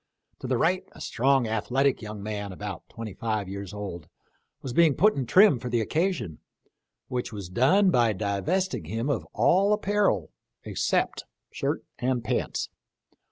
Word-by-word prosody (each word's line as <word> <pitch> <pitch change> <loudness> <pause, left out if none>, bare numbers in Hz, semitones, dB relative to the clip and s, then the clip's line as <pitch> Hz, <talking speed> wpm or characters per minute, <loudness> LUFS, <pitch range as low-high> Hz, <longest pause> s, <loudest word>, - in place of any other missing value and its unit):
To - - -6
the 125 -1 +1
right 185 +8 +2
a - - -14
strong, 135 0 +2
athletic 125 +5 +1
young 105 -2 -7
man, 105 -1 -4
about 90 - -7
twenty 115 -3 -7
five 110 -2 -2
years 100 0 -6
old, 100 -6 -6 0.6
was 130 - -4
being 160 -1 +5
put 215 +2 +5
in 130 -3 -2
trim 190 - +6
for 125 - -5
the 120 0 +1
occasion, 160 - -1 0.7
which 125 -2 -3
was 100 -5 -7
done 145 - +4
by 120 -7 +3
divesting 105 - -1
him 115 - -2
of - - -2
all 195 +3 +4
apparel 205 - +1 0.3
except - - -1 0.3
shirt - - -2 0.2
and 125 -1 0
pants. 120 +2 -2
120 Hz, 155 wpm, -27 LUFS, 105-160 Hz, 0.7 s, trim